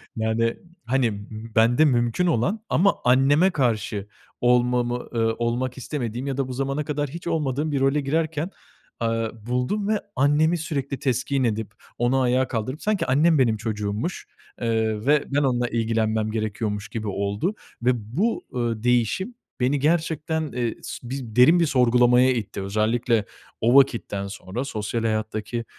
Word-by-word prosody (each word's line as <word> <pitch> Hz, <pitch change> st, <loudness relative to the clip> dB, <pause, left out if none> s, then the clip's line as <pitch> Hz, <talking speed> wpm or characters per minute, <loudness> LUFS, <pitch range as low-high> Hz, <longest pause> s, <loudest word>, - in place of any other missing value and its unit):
Yani, 115 Hz, +1 st, 0 dB, 0.3 s
hani, 115 Hz, -5 st, 0 dB, 0.3 s
bende 120 Hz, +7 st, +5 dB
mümkün 120 Hz, +5 st, +2 dB
olan 175 Hz, -, +1 dB
ama 200 Hz, +4 st, +3 dB
anneme 140 Hz, +8 st, +5 dB
karşı 110 Hz, -, -1 dB, 0.3 s
olmamı, 125 Hz, 0 st, +2 dB
eee, 115 Hz, -, +1 dB, 0.2 s
olmak 120 Hz, +2 st, -1 dB
istemediğim 125 Hz, -2 st, -4 dB
ya 135 Hz, -1 st, -2 dB
da 135 Hz, -2 st, -1 dB
bu 130 Hz, -, -5 dB
zamana 135 Hz, +3 st, -2 dB
kadar 145 Hz, -1 st, -2 dB
hiç 170 Hz, +3 st, -8 dB
olmadığım 150 Hz, -2 st, -1 dB
bir 140 Hz, -, 0 dB
role 135 Hz, +2 st, +2 dB
girerken, 160 Hz, +4 st, -1 dB, 0.5 s
eee, 115 Hz, -1 st, 0 dB, 0.2 s
buldum 125 Hz, +12 st, -1 dB
ve 215 Hz, -1 st, +1 dB, 0.2 s
annemi 150 Hz, +5 st, +3 dB
sürekli 140 Hz, -5 st, -3 dB
teskin 135 Hz, +1 st, 0 dB
edip 110 Hz, -2 st, -1 dB, 0.3 s
onu 125 Hz, +2 st, +2 dB
ayağa 130 Hz, +1 st, +2 dB
kaldırıp 130 Hz, +5 st, -3 dB
sanki 210 Hz, -2 st, +1 dB
annem 150 Hz, +4 st, +3 dB
benim 115 Hz, -4 st, +3 dB
çocuğummuş, 105 Hz, -, -3 dB, 0.3 s
eee, 110 Hz, -1 st, 0 dB
ve 150 Hz, 0 st, +4 dB
ben 140 Hz, -, +1 dB
onunla 125 Hz, -2 st, +1 dB
ilgilenmem 110 Hz, -1 st, 0 dB
gerekiyormuş 105 Hz, -1 st, -3 dB
gibi 110 Hz, -2 st, -4 dB
oldu 100 Hz, -, -1 dB, 0.3 s
ve 125 Hz, +2 st, +3 dB, 0.3 s
bu, 225 Hz, +4 st, +1 dB
ııı, 115 Hz, -2 st, -1 dB
değişim 125 Hz, -, +1 dB, 0.2 s
beni 135 Hz, +3 st, +1 dB
gerçekten, 160 Hz, 0 st, 0 dB
eee, 120 Hz, -2 st, -2 dB
su 120 Hz, -, -7 dB
bi 130 Hz, -5 st, -6 dB
derin 160 Hz, +8 st, +6 dB
bir 170 Hz, -, +4 dB
sorgulamaya 125 Hz, -1 st, +4 dB
itti. 105 Hz, -4 st, -4 dB
Özellikle 110 Hz, +2 st, +1 dB, 0.4 s
o 120 Hz, +3 st, +3 dB
vakitten 115 Hz, -7 st, +3 dB
sonra 100 Hz, +4 st, -5 dB
sosyal 110 Hz, -2 st, -3 dB
hayattaki 110 Hz, +1 st, -2 dB
125 Hz, 145 wpm, -24 LUFS, 115-145 Hz, 0.5 s, derin